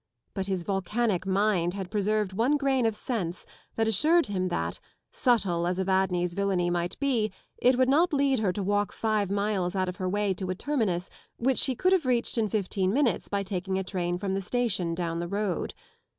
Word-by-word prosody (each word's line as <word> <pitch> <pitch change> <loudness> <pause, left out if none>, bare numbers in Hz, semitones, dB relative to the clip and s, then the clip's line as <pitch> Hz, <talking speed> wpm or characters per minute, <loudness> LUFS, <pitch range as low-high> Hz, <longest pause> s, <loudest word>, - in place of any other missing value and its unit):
But 195 0 -3
his 190 -3 -1
volcanic 195 +1 -1
mind 190 -3 +1
had 190 -2 -5
preserved 210 -1 0
one 245 +9 +2
grain 270 -4 +2
of 220 - -1
sense 195 -8 -3 0.3
that 225 0 +1
assured 310 - +4
him 185 -2 -1
that, 85 - -2 0.3
subtle 190 -9 +1
as 180 0 -1
Evadne's 190 -2 +1
villainy 190 -2 0
might 175 0 -2
be, 245 -7 +1 0.3
it 250 0 +4
would 255 0 +4
not 320 +7 +4
lead 275 -3 +2
her 205 -4 +1
to 195 +2 -3
walk 205 +1 0
five 215 -3 0
miles 200 -2 -1
out 185 -1 0
of 180 - -6
her 185 -1 -2
way 205 0 +1
to 185 0 -5
a 185 - -1
terminus 200 -9 -1 0.3
which 260 +2 +1
she 260 - +2
could 370 +9 +2
have 340 -8 +2
reached 240 -1 +1
in 215 -2 +1
fifteen 195 -2 0
minutes 245 -6 +1
by 200 -1 -1
taking 190 0 -3
a 190 - -1
train 175 -2 -2
from 190 +1 -2
the 195 - -1
station 195 -6 0
down 170 -1 -2
the 170 - -3
road. 200 -1 -2
200 Hz, 200 wpm, -27 LUFS, 185-230 Hz, 0.3 s, assured